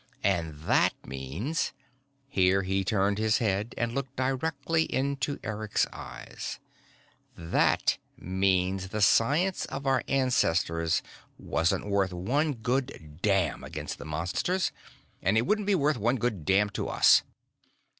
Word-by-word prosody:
And 80 -6 0
that - - +3
means 70 - -3 0.3
" - - -43 0.3
here 95 -5 +2
he 95 +1 0
turned 100 +1 +1
his 110 0 +3
head 105 0 -1
and 120 -1 -1
looked 135 0 -4
directly 160 +5 0
into 140 +1 -1
Eric's 110 -1 0
eyes - - -7 0.8
"that 85 0 +2 0.2
means 95 0 0
the 105 +3 -3
science 150 - +3
of 135 +1 -6
our 135 -1 +2
ancestors 85 -11 +1 0.3
wasn't 80 +4 0
worth 100 -2 +1
one 140 - 0
good 115 - -3
damn 95 -4 +1
against - - -6
the - - -8
Monsters, 90 - -1 0.5
and 95 +4 +2
it 115 - +2
wouldn't 210 +3 0
be 205 - +4
worth 150 -5 +1
one 120 +5 +2
good 115 - -2
damn 100 +2 +3
to - - -3
us!" - - +6
105 Hz, 135 wpm, -28 LUFS, 95-135 Hz, 0.8 s, us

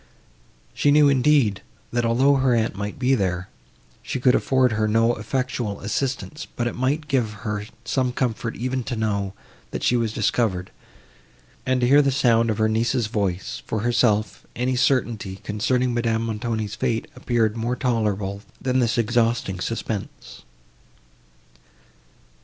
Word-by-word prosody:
She 145 - +2
knew, 145 0 +6
indeed, 135 -6 +3 0.3
that 120 -1 +1
although 135 +4 +4
her 130 -2 +3
aunt 115 -1 +1
might 100 +1 -5
be 130 0 +2
there, 95 -5 -1 0.5
she 130 - -4
could 125 0 +4
afford 130 -2 +2
her 110 -1 +1
no 115 +2 +3
effectual 120 -2 -3
assistance, 135 +7 -3
but 120 - -1
it 120 - -1
might 145 +5 -1
give 125 -6 +1
her 105 -1 -2 0.2
some 130 -2 0
comfort 115 -2 -2
even 130 +1 -2
to 125 - -3
know, 100 -3 -1 0.3
that - - -5
she 125 - +3
was 115 -2 0
discovered, 105 -4 0 1.0
and 130 -1 +2
to 120 - +3
hear 140 +3 +6
the 140 - +2
sound 115 -4 +3
of 110 - 0
her 110 0 +3
niece's 115 +2 +1
voice; 100 -5 -2
for 110 - -2
herself, 110 -2 +1
any 125 +1 0
certainty, 120 -7 0
concerning 125 +4 0
Madame 115 -1 0
Montoni's 110 -1 -3
fate, 120 -1 -1
appeared 115 -3 0
more 120 +2 -1
tolerable, 105 -6 -1 0.2
than 130 0 0
this 115 -1 +1
exhausting 115 -4 +1
suspense. 110 0 -5
115 Hz, 145 wpm, -23 LUFS, 110-130 Hz, 1.0 s, knew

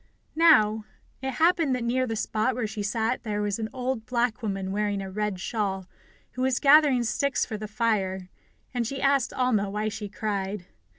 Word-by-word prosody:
Now, 220 -10 +5 0.4
it 265 0 -3
happened 325 -3 +3
that 250 - -3
near 255 +2 0
the 225 - -2
spot 220 +3 0
where 245 -2 -1
she 215 0 -5
sat 225 +3 -1
there 210 -2 -3
was 205 +1 -1
an 220 -1 -3
old 255 -3 -3
black 245 -1 0
woman 195 -3 -3
wearing 205 0 -1
a 195 -1 -6
red 210 -1 -2
shawl, 195 -2 -2 0.5
who 255 - -6
was 260 -1 +1
gathering 285 -3 +5
sticks 245 +4 0
for 220 - -5
the 215 0 -5
fire, 200 -4 -1 0.5
and 240 -2 -1
she 270 +2 -4
asked 275 -2 +2
Alma 230 -6 +1
why 210 +2 -2
she 205 -1 -6
cried. 200 -2 -3
220 Hz, 185 wpm, -26 LUFS, 205-255 Hz, 0.5 s, Now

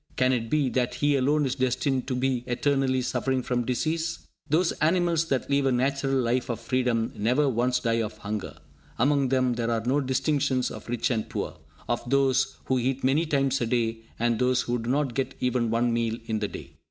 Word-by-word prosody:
Can 130 0 +3
it 115 -2 -2
be 150 -1 +2
that 125 -1 -1
he 145 +1 +2
alone 145 +3 +2
is 130 - 0
destined 130 0 0
to 130 - -1
be 125 -1 0
eternally 130 0 +1
suffering 130 +1 -1
from 120 -1 -1
disease? 160 +7 -1 0.3
Those 165 +4 +3
animals 170 0 +2
that 135 -5 -1
live 140 -1 +2
a - - +3
natural 135 +2 +1
life 125 +1 0
of 115 -2 -2
freedom 125 -3 0
never 125 +8 +2
once 125 0 +1
die 115 0 +1
of 110 -1 -4
hunger. 105 -1 -5 0.4
Among 140 +1 +2
them 130 -1 +2
there 120 -1 -2
are 115 -1 0
no 135 +4 +2
distinctions 135 -1 0
of - - -9
rich 120 +2 0
and 110 -3 -1
poor, - - -4 0.3
of 120 0 0
those 135 0 +2
who 130 -1 +1
eat 130 +2 -1
many 145 +6 +2
times 135 -3 +1
a 120 - 0
day, 115 -2 0 0.2
and 115 -1 +1
those 125 0 +2
who 120 0 -1
do 115 +1 -4
not 135 -1 +1
get 135 +2 -2
even 125 -2 0
one 115 +1 +1
meal 115 -1 0
in 110 -2 -1
the 105 - -1
day. 100 - -10
130 Hz, 205 wpm, -26 LUFS, 120-140 Hz, 0.4 s, Can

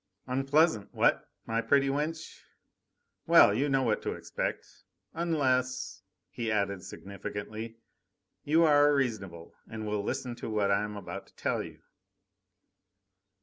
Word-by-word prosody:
"Unpleasant, 135 -3 +2
what? - - +2 0.2
my 115 0 0
pretty 140 +3 +3
wench! 155 +4 -3 0.9
Well, 165 -11 +7
you 140 +7 +1
know 135 -1 +2
what 110 -4 +1
to - - -2
expect... - - -4 0.5
unless," 130 - 0 0.3
he 115 +2 -3
added 100 -3 -1
significantly, 105 +3 -7 0.7
"you 160 +3 +4
are 145 -2 +5
reasonable 100 -11 -3 0.2
and 110 -1 -6
will 105 -1 -1
listen 125 +4 -3
to - - -6
what 105 -2 +1
I 100 0 +3
am 105 0 -5
about 95 0 -7
to - - -25
tell - - -1
you." - - -10
115 Hz, 130 wpm, -30 LUFS, 105-140 Hz, 0.9 s, Well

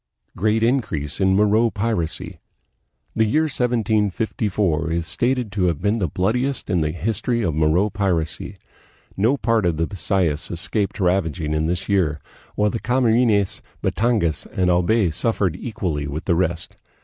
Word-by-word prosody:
Great 110 +4 +1
Increase 115 - 0
in 95 0 +4
Moro 105 +3 +3
Piracy. 100 -6 -2 0.7
The 110 - +2
year 130 +9 +2
1754 105 - 0
is 85 0 -1
stated 125 +3 -1
to 95 -1 0
have 85 -5 0
been 105 +4 0
the 90 - 0
bloodiest 120 - -1
in 90 -3 +2
the 75 - 0
history 110 +7 -1
of 85 - 0
Moro 80 +7 +2
piracy. 90 -6 -2 0.6
No 115 +8 +2
part 115 -4 +1
of 85 -3 0
the 80 - +1
Bisayas 85 -3 -1
escaped 100 +5 -2
ravaging 90 -4 0
in 75 +1 0
this 85 +1 -2
year, 85 -7 +1 0.4
while 105 0 +2
the 115 - -3
Camarines, 115 -5 +2 0.2
Batangas, 110 - 0
and 90 -1 0
Albay 90 +2 +2
suffered 95 0 0
equally 90 -11 -3
with 75 +3 -5
the 90 - +2
rest. 85 -1 -1
100 Hz, 150 wpm, -22 LUFS, 85-110 Hz, 0.7 s, in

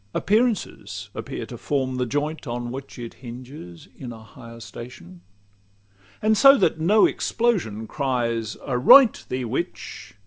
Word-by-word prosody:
Appearances 220 +1 -1
appear - - -6
to - - -10
form 130 -3 -1
the 125 -1 -1
joint 145 +4 -3
On 120 0 -4
which 135 +2 -8
it 120 -2 -7
hinges 120 - -10
in 125 -2 -8
a 110 -1 -11
higher 115 0 -13
station; 100 -5 -11 1.0
And 220 0 +4
so 275 +6 +7
that 160 - +1
no 200 +7 +5
explosion 175 - -1
cry 125 -2 -1 0.3
"Aroint 145 - +6
Thee, 130 0 -2
witch!" 115 -4 -5
130 Hz, 135 wpm, -23 LUFS, 115-160 Hz, 1.0 s, so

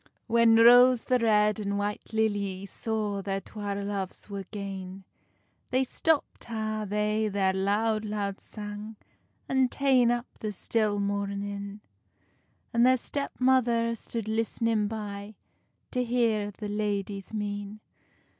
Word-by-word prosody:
When 230 -1 +5
Rose 245 +1 +7
the 250 -1 +2
Red 210 -1 +3
and 200 -1 -2
White 205 +1 -3
Lilly 205 -3 0
Saw 210 -1 -2
their 195 0 -2
twa 205 0 -5
loves 200 0 -4
were 195 -1 -5
gane, 195 -2 -6 0.7
Then 260 +1 +2
stopped 320 +3 0
ha 215 -2 -3
they 210 +1 0
their 195 -2 +1
loud, 210 +3 +1
loud 205 -2 -3
sang, 210 +1 -7 0.5
And 265 -1 +2
tane 260 -4 +3
up 240 0 0
the 215 - -3
still 210 +1 0
moarnin; 200 0 -3 0.9
And 235 0 +4
their 255 +1 +6
step 280 +3 -3
mother 240 -3 +3
stood 230 -1 -5
listnin 225 -1 0
by, 205 -1 -6 0.6
To 250 -1 0
hear 230 -4 +1
the 210 +1 -7
ladies' 205 -2 -2
mean. 205 -1 -4
210 Hz, 125 wpm, -28 LUFS, 200-230 Hz, 0.9 s, Rose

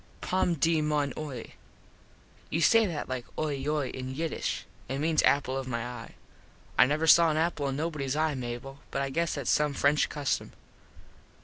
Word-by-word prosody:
_ - - -28
Pom 180 -2 +2
de 160 +2 +2
mon 150 -3 0
oie: 140 -6 -6 1.0
You 160 - -1
say 225 +5 +5
that 160 -5 -4
like 130 -1 -4
oie 155 -1 0
yoy 150 -2 0
in 130 0 -6
Yiddish. 160 +2 -2 0.2
It 135 - -2
means 155 +2 +2
apple 135 -2 +2
of 135 -1 -3
my 115 -2 -2
eye. 125 0 -8 0.6
I 125 - +6
never 150 +3 0
saw 165 +1 +7
an 155 - 0
apple 160 -3 0
in 135 0 -2
nobodys 150 -4 -2
eye, 155 0 +1
Mable, 125 +1 -6
but 140 - -1
I 135 - -3
guess 170 +3 0
thats 140 -4 -1
some 150 -2 +2
French 145 +2 +3
custom. 145 -2 -2
145 Hz, 185 wpm, -29 LUFS, 135-160 Hz, 1.0 s, saw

